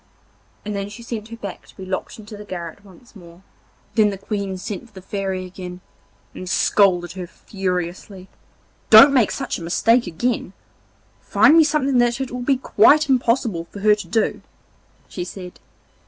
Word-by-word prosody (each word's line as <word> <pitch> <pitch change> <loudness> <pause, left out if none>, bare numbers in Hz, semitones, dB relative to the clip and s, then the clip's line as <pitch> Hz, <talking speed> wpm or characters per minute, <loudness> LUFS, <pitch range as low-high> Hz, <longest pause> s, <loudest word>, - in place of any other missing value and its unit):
And 210 0 -4
then 200 0 -4
she 225 +3 -11
sent 225 -2 -6
her 230 - -9
back 200 -4 -8
to - - -20
be 190 - -8
locked 185 0 -5
into 215 0 -11
the 210 - -9
garret 175 -1 -8
once 205 +5 -19
more. 175 -1 -15 0.5
Then 215 -2 +4
the 200 - -5
Queen 200 -1 -4
sent 200 +4 -6
for 220 - -27
the 190 - -10
Fairy 190 -1 -3
again 180 -1 -9 0.5
and 185 - -8
scolded 180 -3 +2
her 180 -1 -7
furiously. 185 0 -5 0.6
'Don't 230 +6 +9
make 245 -6 +4
such 270 -7 -4
a - - -11
mistake 225 +7 +2
again; 195 +3 -2 0.7
find 305 - +4
me 330 - +7
something 285 -4 +1
that 240 +1 +2
it 265 -2 -4
will 250 0 -5
be 270 +2 +1
quite 285 +5 +4
impossible 230 -8 +1
for 200 +3 -11
her 210 +1 +5
to 210 0 -4
do,' 225 -2 0 0.7
she 180 - -5
said. 180 0 -9
205 Hz, 175 wpm, -21 LUFS, 185-235 Hz, 0.7 s, Don't